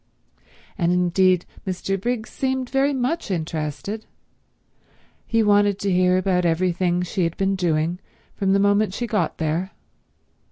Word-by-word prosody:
And 170 -1 +2
indeed 180 0 +3 0.2
Mr. 190 +1 -2
Briggs 235 -1 -2
seemed 260 -1 -2
very 270 +2 +2
much 270 +4 -1
interested. 165 +4 -4 1.2
He 225 -1 +2
wanted 205 -1 +3
to 200 -1 -1
hear 180 0 +3
all - - +3
about 185 -1 +1
everything 175 +1 +1
she 180 +1 -2
had 165 0 -2
been 195 0 +1
doing 170 -1 0 0.4
from 195 -1 +1
the - - +4
moment 200 0 +2
she 240 - -2
got 215 -2 -1
there. 165 +4 -2
190 Hz, 145 wpm, -23 LUFS, 175-210 Hz, 1.2 s, the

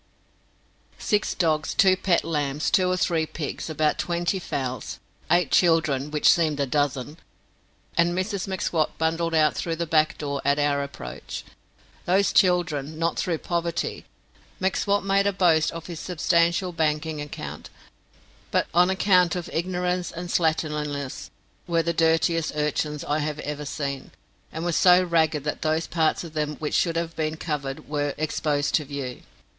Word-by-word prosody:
Six 210 0 0
dogs, 155 -4 0
two 190 -1 +5
pet 185 -2 +1
lambs, 150 -2 -1
two 185 -1 +3
or 185 - +1
three 165 -3 +1
pigs, 155 +1 -5
about 155 -1 0
twenty 175 +2 -1
fowls, 130 -7 -4 0.3
eight 175 -2 +3
children 155 -5 +3
which 150 0 +1
seemed 155 -4 +4
a 140 - +2
dozen, 145 +2 -1 0.8
and 170 +1 +2
Mrs 195 0 -2
M'Swat 175 -4 -1
bundled 165 +1 0
out 155 -1 +4
through 165 -1 -2
the 170 +1 -2
back 155 -1 +2
door 140 -1 -3
at 140 +1 +2
our 145 -1 +1
approach. 140 - -7 0.6
Those 195 +3 +2
children, 160 -5 +2
not 165 0 0
through 170 -3 0
poverty 170 +1 -3 0.5
M'Swat 200 +1 +1
made 195 0 +3
a - - +3
boast 170 -5 +3
of 165 -1 -8
his 170 -3 -7
substantial 170 +1 +1
banking 155 -1 -1
account 150 - -7 0.8
but - - +1
on 175 +2 +5
account 185 -2 +3
of 175 -2 -5
ignorance 180 +1 -1
and 175 +1 -6
slatternliness, 150 -4 -1 0.4
were 170 -1 +1
the 170 +1 0
dirtiest 165 0 +2
urchins 150 0 -1
I 150 +1 0
have 150 0 -2
ever 150 0 -5
seen, 140 -2 -4 0.4
and 160 - -5
were 175 - +1
so 180 +2 +5
ragged 160 -4 +1
that 150 - -3
those 160 +1 0
parts 160 -1 0
of 165 -2 -9
them 150 -1 -2
which 150 0 -4
should 170 -2 +2
have 165 0 -2
been 155 0 -2
covered 145 -4 -4
were 145 -1 -2
exposed 145 -1 -1
to 150 - +2
view. 135 -3 -6
160 Hz, 155 wpm, -25 LUFS, 150-175 Hz, 0.8 s, two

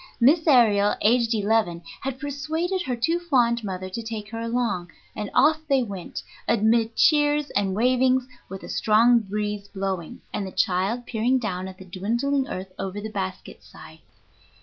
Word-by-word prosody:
Miss 275 +8 +5
Aërial, 215 -8 +4
aged 230 +1 +3
eleven, 205 -5 +1 0.2
had 265 -1 -4
persuaded 315 +6 -2
her 260 -7 -2
too 325 +9 0
fond 240 -8 +2
mother 185 -2 -4
to 185 +5 -5
take 220 -2 -6
her 225 - -5
along, 230 -6 -1 0.3
and 210 - -4
off 305 +5 +5
they 270 -2 +3
went, 195 -6 -7 0.2
amid 225 +1 +2
cheers 295 -1 +3
and 195 -2 0
wavings, 255 +2 +2 0.2
with 190 +1 -8
a - - -8
strong 230 +2 +4
breeze 210 -1 -4
blowing, 190 -4 -4
and 195 - -2
the - - -7
child 200 +5 0
peering 240 +3 +1
down 190 -6 -3
at 190 -1 -10
the 190 - -12
dwindling 235 +9 -1
earth 185 +1 -6
over 195 +1 -4
the 215 +1 -6
basket 185 -2 -6
side. - - -14
225 Hz, 165 wpm, -24 LUFS, 195-255 Hz, 0.3 s, Miss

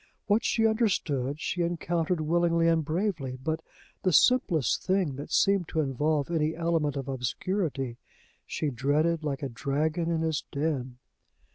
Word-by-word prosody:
What 215 +1 +2
she 225 - +2
understood, 160 - +1
she 175 - -2
encountered 170 0 0
willingly 170 +1 +2
and 165 -1 +3
bravely; 160 -5 -2
but, 160 +2 -1 0.4
the 185 - +2
simplest 170 - +3
thing 185 -7 +1
that 145 - -7
seemed 195 -4 +3
to 160 - -2
involve 150 +2 0
any 155 -1 +1
element 165 -3 0
of 135 -1 -4
obscurity, 135 - -2 0.5
she 150 -2 -2
dreaded 150 +6 +1
like 145 -1 -3
a 135 - -2
dragon 155 +6 -1
in 165 -1 0
his 160 -3 -1
den. 140 -4 -2
160 Hz, 145 wpm, -28 LUFS, 140-175 Hz, 0.5 s, and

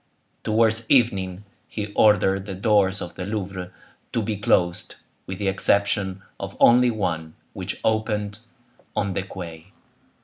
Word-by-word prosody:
Towards 110 +1 +2
evening 100 -7 +2 0.2
he 105 -1 -5
ordered 100 -2 +3
the 95 - -4
doors 100 -1 +2
of 90 - -8
the 90 - -6
Louvre 95 -3 -4 0.4
to 115 - +1
be 105 +1 -2
closed, 90 -5 +1 0.3
with 95 - -5
the 100 - -2
exception 100 0 +1 0.2
of - - -6
only 125 +1 +6
one, 85 -8 -2 0.2
which - - -5
opened 105 -1 0 0.6
on 100 -2 0
the 95 - -1
quay. 85 -3 -8
100 Hz, 135 wpm, -24 LUFS, 95-110 Hz, 0.6 s, only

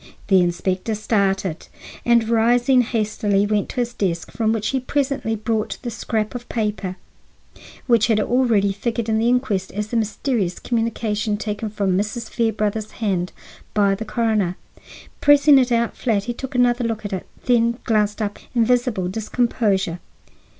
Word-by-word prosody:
The 190 -2 +6
inspector 185 +4 -1
started, 195 -5 0 0.4
and, 235 -2 +3
rising 240 +3 +4
hastily, 210 -3 0
went 205 -1 0
to - - -8
his 240 -1 -1
desk, 175 -7 -2
from 220 -1 0
which 220 -1 -1
he 265 - 0
presently 270 -3 -1
brought 220 0 -2
the 240 - -3
scrap 215 -1 -2
of 245 -1 -7
paper 210 -4 -2 0.9
which 235 -4 +4
had 220 -2 +3
already 220 -4 +2
figured 230 +2 -2
in 220 0 +2
the 230 +2 +2
inquest 230 -7 0
as 210 +2 -3
the 235 - -1
mysterious 215 -3 -1
communication 225 -3 -1
taken 210 +1 -3
from 200 -3 0
Mrs. 215 +4 -2
Fairbrother's 215 -2 -1
hand 185 -5 -1 0.4
by 200 -2 +4
the 200 +3 -3
coroner. 215 -5 0 0.7
Pressing 290 -1 +6
it 250 -1 +1
out 235 0 +1
flat, 215 -5 0
he 240 - -3
took 265 +2 -7
another 245 0 +3
look 225 -2 -3
at 205 - -4
it, 185 - -4 0.2
then 235 -1 +3
glanced 215 -1 +1
up 205 0 -4 0.2
in 230 -2 +4
visible 240 -6 +1
discomposure. 205 -3 0
220 Hz, 155 wpm, -21 LUFS, 205-240 Hz, 0.9 s, The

